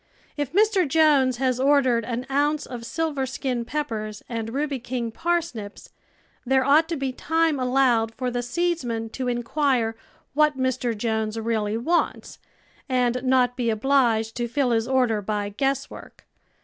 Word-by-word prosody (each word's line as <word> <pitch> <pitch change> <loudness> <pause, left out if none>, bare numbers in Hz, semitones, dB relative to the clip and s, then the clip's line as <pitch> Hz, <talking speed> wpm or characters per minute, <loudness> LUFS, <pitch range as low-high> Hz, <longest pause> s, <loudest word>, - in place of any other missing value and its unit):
If 290 -3 -3
Mr. 400 -2 +3
Jones 275 -4 +3
has 255 -1 0
ordered 260 -4 +3
an 245 +1 -3
ounce 290 +2 +1
of 235 -2 -7
silver 295 -4 -2
skin 255 -2 -2
jDcppers 220 -7 -4
and 225 -2 -4
rubj^' 275 0 -3
king 240 -2 -3
parsnips, 330 -10 -3 0.5
there 265 +1 +2
ought 310 +4 +4
to 335 - -1
be 270 -1 -2
time 320 +2 0
allowed 250 -3 +2
for 250 -1 -2
the 245 0 -1
seedsman 245 -6 -2
to 255 +1 -4
inquire 240 -1 0 0.4
what 300 -1 +3
Mr. 255 -3 -1
Jones 220 0 -1
really 220 -1 -1
wants, 330 +9 -1 0.5
and 250 -1 +1
not 255 -1 +2
be 245 -2 -1
obliged 225 -1 +2
to 240 -1 -1
fill 260 +1 0
his 225 0 +1
order 250 -5 +2
by 205 0 -2
guesswork. 270 +7 -4
255 Hz, 150 wpm, -24 LUFS, 230-280 Hz, 0.5 s, ought